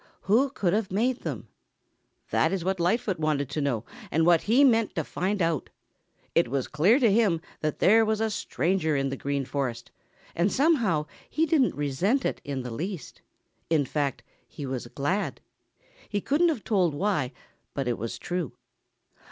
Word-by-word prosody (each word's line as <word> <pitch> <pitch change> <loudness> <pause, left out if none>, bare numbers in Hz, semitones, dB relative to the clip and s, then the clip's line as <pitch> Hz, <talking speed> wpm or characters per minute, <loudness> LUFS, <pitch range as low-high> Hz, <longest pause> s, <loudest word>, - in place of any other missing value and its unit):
Who 235 +8 +3
could 190 -9 0
have 215 -2 0
made 240 +6 +1
them? - - -5 0.8
That 160 - +3
is 190 -3 -2
what 190 0 0
Lightfoot 185 +1 +1
wanted 150 -3 0
to 155 - -1
know 125 -6 -1 0.2
and 160 +2 +2
what 170 -2 +5
he 255 +5 +6
meant 230 -5 +3
to 160 - 0
find 190 +5 -1
out. 165 -4 -1 0.6
It - - +3
was 130 +1 -1
clear 175 - +4
to 240 -7 +4
him 200 -6 +3 0.2
that 155 -1 -2
there 225 +3 +5
was 220 -1 0
a 220 0 0
stranger 165 -2 0
in 135 0 0
the 135 - -3
Green 140 0 -2
Forest, 125 -4 -3 0.4
and 175 +4 +1
somehow 235 - +2 0.2
he 320 - +1
didn't 290 -5 +2
resent 160 - 0
it - - -2
in 135 -3 -4
the 125 - -6
least. 170 - -6 0.5
In 155 -4 +3
fact, 140 -1 -2 0.2
he 145 - -7
was 130 -2 -4
glad. 145 +11 -2 0.7
He 205 - 0
couldn't 305 - +2
have 275 -10 -2
told 180 -8 +1
why, 150 -7 0 0.4
but 135 -2 -2
it 120 -3 -1
was 115 +2 -4
true. 175 -8 -3
170 Hz, 175 wpm, -27 LUFS, 140-215 Hz, 0.8 s, he